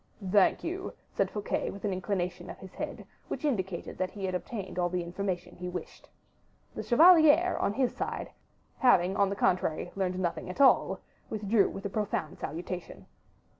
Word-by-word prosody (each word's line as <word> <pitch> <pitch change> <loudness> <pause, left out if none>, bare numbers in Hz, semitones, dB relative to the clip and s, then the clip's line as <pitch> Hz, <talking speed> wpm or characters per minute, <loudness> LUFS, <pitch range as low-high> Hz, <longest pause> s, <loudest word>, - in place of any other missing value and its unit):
"Thank 200 -1 +4
you," 365 +3 -4 0.2
said - - 0
Fouquet, 210 -1 -2
with 200 +1 -7
an 200 - 0
inclination 180 -2 -3
of - - -8
the - - -10
head, 190 - -6 0.2
which - - -4
indicated 190 - -2
that 185 0 0
he 195 0 -5
had 185 - -2
obtained 190 0 -4
all 175 0 +2
the 180 0 -1
information 180 0 -4
he 180 0 -5
wished. 180 0 -8 0.6
The - - -4
chevalier, 325 +4 +6
on 200 - +1
his 255 +2 0
side, - - -4 0.5
having, 190 -8 +4
on 200 -1 +3
the 200 - -2
contrary, 175 -3 0
learned 185 -2 -1
nothing 180 -1 -2
at 185 - -7
all, 275 -1 +5 0.3
withdrew 210 -1 +2
with 195 - -8
a - - -1
profound 195 -6 -2
salutation. 175 +3 -6
190 Hz, 170 wpm, -30 LUFS, 180-215 Hz, 0.6 s, chevalier